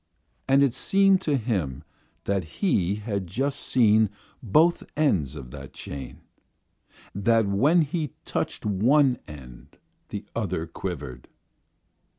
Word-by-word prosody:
And 135 +1 +5
it 135 -4 +2
seemed 195 +7 +3
to 150 -6 +1
him 90 - -2 0.4
that 100 -2 0
he 95 - 0
had 100 -3 -4
just 135 +10 -2
seen 110 -3 +3 0.3
both 155 - +3 0.2
ends 90 - +1
of 65 -4 -9
that - - -10
chain; 70 -1 -8 0.9
that 115 +2 +2
when 140 - +3
he 150 -2 -3
touched - - -3
one 125 +6 +3
end 65 -5 -12 0.3
the - - -6
other 80 - -2
quivered. 75 -8 -6
105 Hz, 120 wpm, -25 LUFS, 85-140 Hz, 0.9 s, And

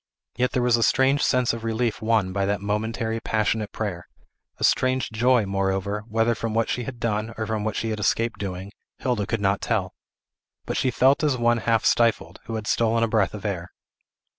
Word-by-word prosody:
Yet 125 +1 0
there 125 - +1
was 120 -1 +4
a - - -1
strange 135 +4 +3
sense 125 -2 +2
of 115 -1 -6
relief 115 0 -1
won 110 -4 +1
by 100 0 0
that 100 0 0
momentary, 110 +3 -2
passionate 110 -1 -1
prayer; 95 -6 -4 0.5
a - - -6
strange 130 -2 +2
joy, 120 0 +3
moreover, 95 +1 -1
whether 115 +1 +1
from 115 -1 -4
what 115 0 +1
she 125 - -2
had 125 -1 -7
done, 110 0 -2
or 110 - -2
for 110 0 -2
what 110 +1 -2
she 115 - -2
had 110 - -3
escaped 115 +3 0
doing, 95 0 -5 0.3
Hilda 120 -6 -1
could 115 -2 -2
not 100 0 +1
tell. - - -1 0.7
But - - -3
she 130 - +1
felt 135 +4 +3
as 145 -4 +2
one 120 0 +2
half 115 0 +1
stifled, 115 -2 +2
who 115 - -5
has 110 -1 -5
stolen 115 0 +2
a - - +3
breath 110 -4 +1
of 105 - -9
air. 90 -4 -3
110 Hz, 205 wpm, -24 LUFS, 105-120 Hz, 0.7 s, was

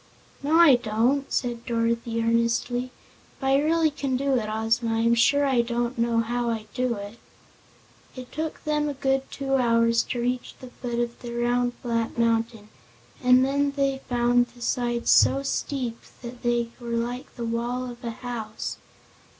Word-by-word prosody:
"No, 295 +3 +1
I 300 -7 +8
don't," 245 +5 0
said 240 -2 -2
Dorothy 230 0 -1
earnestly. 235 +2 +1 0.5
"If - - -13
I 270 +1 +3
really 320 +1 +2
can 275 -3 -2
do 275 +1 0
it, 220 -4 -1
Ozma, 225 +1 0
I 225 - +1
am 230 +1 +3
sure 285 +5 +4
I 260 -3 +3
don't 235 +1 -2
know 230 0 +2
how 240 +1 -1
I 220 -2 -3
do 250 -1 0
it." 205 +3 -8 1.0
It 255 -1 -9
took 315 +1 -4
them 300 -1 0
a 285 - -4
good 270 0 0
two 270 -1 -1
hours 230 -1 +3
to 245 - -3
reach 250 +1 -2
the 255 -1 -11
foot 240 -1 -5
of 235 0 -2
the 235 -1 -6
round, 245 +1 +1
flat 230 -1 -1
mountain, 230 -2 0 0.5
and 250 +1 +6
then 280 +1 +1
they 275 -1 0
found 245 0 +3
the 240 0 -18
sides 240 -1 0
so 275 - +5
steep 255 -4 -2 0.2
that 240 0 -8
they 240 -1 0
were 240 - -9
like 245 +2 -4
the 235 - -4
wall 240 +2 -2
of 240 0 -10
a 235 - -3
house. 230 -2 -5
240 Hz, 175 wpm, -25 LUFS, 230-265 Hz, 1.0 s, I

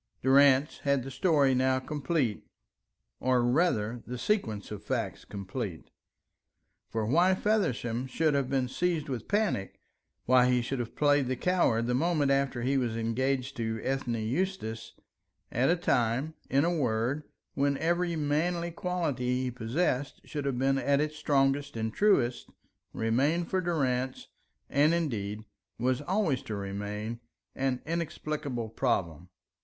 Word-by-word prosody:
Durrance 135 +1 +5
had 140 -2 +1
the 135 - -7
story 140 -2 +3
now 130 +1 +2
complete, 135 -4 -1 0.8
or 125 -1 +2
rather, 120 -5 +1
the 125 +1 -4
sequence 115 - -1
of 105 -1 -6
facts - - -3
complete. 100 -2 -6 1.0
For 110 -1 -1
why 175 - +4
Feversham 130 - 0
should 155 +3 +1
have 140 -2 0
been 135 -2 +1
seized 165 +2 -1
with 125 -5 -4
panic, 205 - 0 0.5
why 125 0 +5
he 125 -1 +2
should 135 +2 -3
have 120 -1 -5
played 145 -2 +3
the 130 - 0
coward 130 -8 +2
the 125 - 0
moment 150 0 +2
after 135 -3 +1
he 135 +2 +2
was 120 -3 -1
engaged 130 +4 -1
to 110 -1 -2
Ethne 135 -3 -1
Eustace 115 - -2 0.6
at 125 +4 +2
a 175 - +4
time, 135 -3 0 0.2
in 140 +3 +3
a 175 0 +1
word, 125 0 0 0.3
when 140 0 +1
every 170 +2 0
manly 165 +3 0
quality 145 -9 -1
he 125 - -2
possessed 125 +4 -1
should 145 -2 -4
have 135 -3 -1
been 135 +1 +2
at 140 0 +2
its 150 +1 -1
strongest 140 -2 +1
and 110 0 -2
truest, 135 - +2 0.4
remained 140 +10 0
for 185 - +2
Durrance, 130 -7 -1 0.4
and 150 +4 +3
indeed, 110 -11 -2 0.4
was 125 +3 0
always 170 - 0
to 110 - -5
remain, 105 +3 -4 0.3
an 130 -2 -1
inexplicable 150 -7 -3
problem. 90 - -1
135 Hz, 140 wpm, -29 LUFS, 120-155 Hz, 1.0 s, Durrance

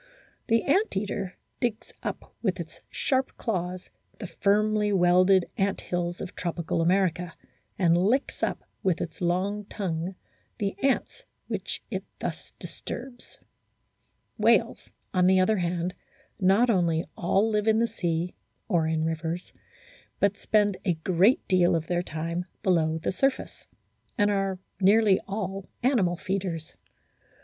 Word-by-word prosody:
The 230 -1 +3
ant 375 - +2
eater 195 -2 -3 0.2
digs 240 -4 -2
up - - -5
with - - 0
its - - -7
sharp 260 -1 0
claws 180 -4 -3 0.3
the - - -6
firmly 210 +3 +2
welded 185 0 +5
ant 195 0 +1
hills 175 0 -2
of 190 - -7
tropical 170 -1 -2
America, 180 -1 +1 0.4
and 170 -3 +4
licks 215 +10 +1
up - - -1 0.2
with 185 -3 +1
its 160 +1 -5
long 190 +4 0
tongue 185 -3 -3 0.4
the 200 -1 -1
ants 275 - 0 0.2
which - - -4
it - - -2
thus - - -5
disturbs. 245 -1 -8 1.0
Whales, - - +3 0.2
on 180 -1 +4
the 190 0 +5
other 205 +4 +3
hand, 175 0 -1 0.5
not 200 +6 +4
only 170 -5 +2
all 195 +5 +2
live 210 0 0
in 220 0 +5
the 230 - +3
sea 175 -5 -2 0.3
(or 170 -6 +2
in 160 0 0
rivers), 165 +2 -3 0.7
but 200 0 +3
spend 205 -2 +2
a 175 -3 +1
great 185 +8 +3
deal 180 -2 +4
of 165 -1 -1
their 175 +1 0
time 170 +1 -3 0.2
below 160 -4 +2
the 160 - -2
surface, 270 +8 -1 0.5
and 205 -2 +3
are 195 -1 0 0.2
nearly 200 0 +5
all 195 -1 -4
animal 205 -10 +2
feeders. 180 -4 -3
185 Hz, 135 wpm, -27 LUFS, 175-205 Hz, 1.0 s, welded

